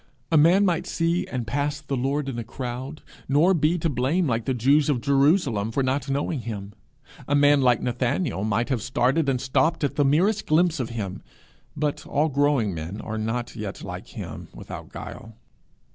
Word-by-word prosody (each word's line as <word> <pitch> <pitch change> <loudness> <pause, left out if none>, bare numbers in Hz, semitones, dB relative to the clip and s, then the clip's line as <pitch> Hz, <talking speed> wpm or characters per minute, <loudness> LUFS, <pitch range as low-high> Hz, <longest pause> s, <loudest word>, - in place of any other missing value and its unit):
A - - +3
man 175 +7 +5
might 175 -4 0
see 165 +1 0
and 125 -3 -3
pass 145 +5 -1
the 140 -2 -4
Lord 135 +3 -1
in 125 -3 -3
a - - -3
crowd, 125 +5 -6 0.3
nor 155 +7 +4
be 160 +1 +2
to 165 - -1
blame 145 +6 +1
like 115 -5 -1
the 130 - 0
Jews 140 +6 +3
of 135 -4 +2
Jerusalem 140 - +2
for 135 +4 0
not 130 +1 -1
knowing 140 +2 -1
him. 105 -4 -6 0.5
A 145 - +2
man 145 0 +5
like 125 -2 +3
Nathanael 125 - -1
might 115 +3 0
have 130 -5 0
started 130 +5 +1
and 130 -2 +1
stopped 135 +6 +1
at 145 - -1
the 145 - +4
merest 180 +10 +2
glimpse 165 0 +3
of 125 - -2
him, 105 -5 -5 0.6
but 150 -1 -1
all 150 +3 +1
growing 140 -7 +2
men 85 +6 -6
are 110 +1 -4
not 120 +3 -3
yet 105 -3 -6
like - - -7
him - - -8
without - - -9
guile. 115 -1 -9
135 Hz, 190 wpm, -25 LUFS, 120-150 Hz, 0.6 s, man